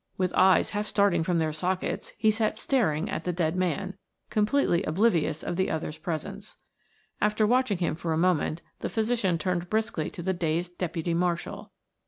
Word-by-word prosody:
With 185 Hz, -1 st, 0 dB
eyes 190 Hz, 0 st, +4 dB
half 210 Hz, 0 st, -2 dB
starting 200 Hz, -6 st, +3 dB
from 170 Hz, +1 st, +1 dB
their 160 Hz, -1 st, 0 dB
sockets 180 Hz, +4 st, -2 dB
he 220 Hz, 0 st, +4 dB
sat 215 Hz, 0 st, 0 dB
staring 195 Hz, -, +1 dB
at 165 Hz, -, -3 dB
the 180 Hz, -, -1 dB
dead 170 Hz, -1 st, 0 dB
man, 185 Hz, +1 st, -1 dB, 0.4 s
completely 210 Hz, -4 st, +2 dB
oblivious 165 Hz, -4 st, +1 dB
of 175 Hz, -, -3 dB
the 190 Hz, -, +1 dB
others' 155 Hz, -1 st, -3 dB
presence. 190 Hz, +6 st, -5 dB, 0.6 s
After 210 Hz, +1 st, +3 dB
watching 245 Hz, -3 st, +2 dB
him 175 Hz, -, 0 dB
for 165 Hz, +1 st, -3 dB
a 160 Hz, -, +1 dB
moment 170 Hz, -2 st, +1 dB, 0.2 s
the -, -, -3 dB
physician 220 Hz, -6 st, +1 dB
turned 175 Hz, +1 st, -2 dB
briskly 220 Hz, -8 st, -1 dB
to 175 Hz, -, -8 dB
the 190 Hz, +2 st, +1 dB
dazed 175 Hz, +1 st, -2 dB
deputy 170 Hz, -1 st, -2 dB
marshal. 175 Hz, 0 st, -2 dB
180 Hz, 175 wpm, -27 LUFS, 165-210 Hz, 0.6 s, eyes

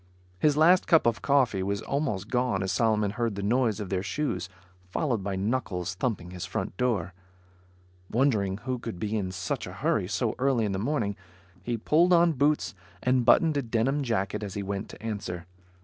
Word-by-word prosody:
His 150 Hz, +4 st, +3 dB
last 175 Hz, +4 st, +5 dB
cup 165 Hz, -3 st, +5 dB
of 115 Hz, -4 st, +1 dB
coffee 130 Hz, -9 st, +2 dB
was 100 Hz, +2 st, -2 dB
almost 135 Hz, -9 st, -2 dB
gone 125 Hz, -6 st, +1 dB
as 95 Hz, -, -1 dB
Solomon 105 Hz, -1 st, +2 dB
heard 115 Hz, -1 st, -1 dB
the 100 Hz, -, -4 dB
noise 115 Hz, 0 st, +1 dB
of 100 Hz, -3 st, -5 dB
their 95 Hz, -1 st, 0 dB
shoes, 95 Hz, -, -2 dB, 0.4 s
followed 120 Hz, -, -1 dB
by 100 Hz, -1 st, -2 dB
knuckles 95 Hz, -4 st, -2 dB
thumping 90 Hz, -4 st, -3 dB
his 90 Hz, -1 st, -6 dB
front -, -, -4 dB
door. 100 Hz, -7 st, 0 dB, 1.0 s
Wondering 110 Hz, -7 st, +1 dB
who 130 Hz, -1 st, -2 dB
could 115 Hz, -5 st, -6 dB
be 105 Hz, +4 st, -2 dB
in 95 Hz, -4 st, -1 dB
such 90 Hz, -2 st, -3 dB
a -, -, -8 dB
hurry, -, -, 0 dB
so -, -, 0 dB
early 130 Hz, -4 st, +2 dB
in 105 Hz, -, -1 dB
the 95 Hz, -, -2 dB
morning, 110 Hz, -4 st, -1 dB, 0.5 s
he 120 Hz, +4 st, -2 dB
pulled 165 Hz, +10 st, +3 dB
on 170 Hz, 0 st, +5 dB
boots 145 Hz, +2 st, +1 dB, 0.3 s
and 125 Hz, -1 st, +2 dB
buttoned 155 Hz, +2 st, +5 dB
a -, -, +2 dB
denim 120 Hz, +4 st, 0 dB
jacket 105 Hz, -5 st, -1 dB
as 100 Hz, -2 st, -5 dB
he 100 Hz, -, -2 dB
went 100 Hz, 0 st, -4 dB
to -, -, -12 dB
answer. 95 Hz, -6 st, -4 dB
110 Hz, 190 wpm, -27 LUFS, 95-130 Hz, 1.0 s, last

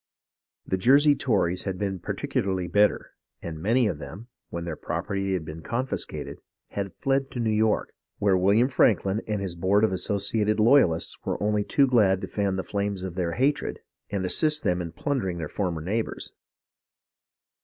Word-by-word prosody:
The 95 Hz, -, -1 dB
Jersey 140 Hz, +8 st, +6 dB
Tories 100 Hz, -10 st, 0 dB
had 95 Hz, -2 st, -3 dB
been 95 Hz, -1 st, -2 dB
particularly 95 Hz, +1 st, -2 dB
bitter, 105 Hz, +4 st, +2 dB, 0.3 s
and 80 Hz, -2 st, -7 dB
many 115 Hz, +6 st, +3 dB
of 90 Hz, -9 st, -1 dB
them, 95 Hz, -, -9 dB, 0.2 s
when 85 Hz, 0 st, -5 dB
their 85 Hz, -2 st, -4 dB
property 95 Hz, +4 st, -3 dB
had 90 Hz, -4 st, -2 dB
been 80 Hz, +1 st, -8 dB
confiscated, 125 Hz, +8 st, -4 dB, 0.3 s
had 100 Hz, -1 st, -4 dB
fled 135 Hz, 0 st, 0 dB
to 125 Hz, -, -6 dB
New 115 Hz, -2 st, +1 dB
York, 110 Hz, 0 st, +1 dB, 0.2 s
where 100 Hz, -2 st, +3 dB
William 100 Hz, +7 st, +4 dB
Franklin 105 Hz, -5 st, +2 dB
and 105 Hz, -2 st, -2 dB
his 95 Hz, -3 st, -4 dB
Board 95 Hz, +5 st, +2 dB
of 110 Hz, -, +3 dB
Associated 105 Hz, +3 st, 0 dB
Loyalists 110 Hz, -8 st, +3 dB
were -, -, -2 dB
only 105 Hz, 0 st, +1 dB
too 140 Hz, +6 st, +3 dB
glad 105 Hz, -7 st, +3 dB
to 95 Hz, -, -4 dB
fan 100 Hz, 0 st, -1 dB
the 95 Hz, -, -2 dB
flames 100 Hz, -2 st, -3 dB
of 95 Hz, -2 st, -4 dB
their 85 Hz, -2 st, -2 dB
hatred 140 Hz, +4 st, 0 dB, 0.3 s
and 100 Hz, -2 st, -2 dB
assist 150 Hz, -, +2 dB
them 90 Hz, 0 st, +1 dB
in 85 Hz, -1 st, -5 dB
plundering 110 Hz, -, -2 dB
their 80 Hz, -2 st, -4 dB
former 85 Hz, -2 st, -2 dB
neighbours. 110 Hz, +7 st, -3 dB
100 Hz, 170 wpm, -26 LUFS, 90-110 Hz, 0.3 s, Jersey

